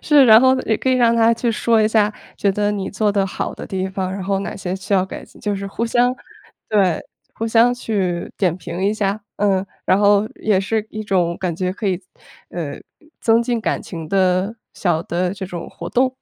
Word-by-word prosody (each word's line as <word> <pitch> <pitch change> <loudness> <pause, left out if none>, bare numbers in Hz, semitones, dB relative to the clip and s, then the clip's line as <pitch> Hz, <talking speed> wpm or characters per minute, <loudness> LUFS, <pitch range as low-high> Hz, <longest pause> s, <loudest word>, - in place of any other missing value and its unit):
是， 290 -3 +6
然 220 -1 +8
后 260 0 +4
也 220 - +1
可 - - -1
以 - - +4
让 235 -2 +4
他 230 0 +4
去 235 +1 0
说 225 +1 +2
一 215 - +4
下， 215 -1 +2 0.3
觉 200 - +2
得 205 +1 0
你 195 -2 -3
做 205 0 +1
得 195 -1 +1
好 185 - -4
的 - - -8
地 190 0 -2
方， 190 -1 -3
然 195 -1 -5
后 195 0 0
哪 195 - -5
些 185 -2 -3
需 195 +1 -2
要 185 -1 +3
改 190 - -8
进。 - - -19
就 205 -1 -1
是 200 0 -4
互 205 +4 -3
相 245 +2 +2 0.6
对， 195 -6 +2 0.3
互 225 - -3
相 230 +2 +4
去 190 -7 -2
点 180 -4 +1
评 175 0 -6
一 200 - +2
下， 205 0 -1 0.2
嗯。 195 -2 +1 0.2
然 190 - +3
后 205 0 +4
也 210 -3 +1
是 210 +3 -1
一 215 0 -6
种 180 -4 +1
感 180 -3 -2
觉 180 +2 -1
可 205 +3 -4
以， 185 0 -1 0.5
呃， 155 -5 -5 0.4
增 230 0 +4
进 235 -1 -1
感 - - -1
情 165 -3 -7
的 185 +2 +2 0.2
小 170 -4 0
的 180 +1 -1
这 195 - -6
种 175 -2 -6
活 170 - -8
动， 255 +1 +1
200 Hz, 235 characters per minute, -20 LUFS, 185-225 Hz, 0.6 s, 然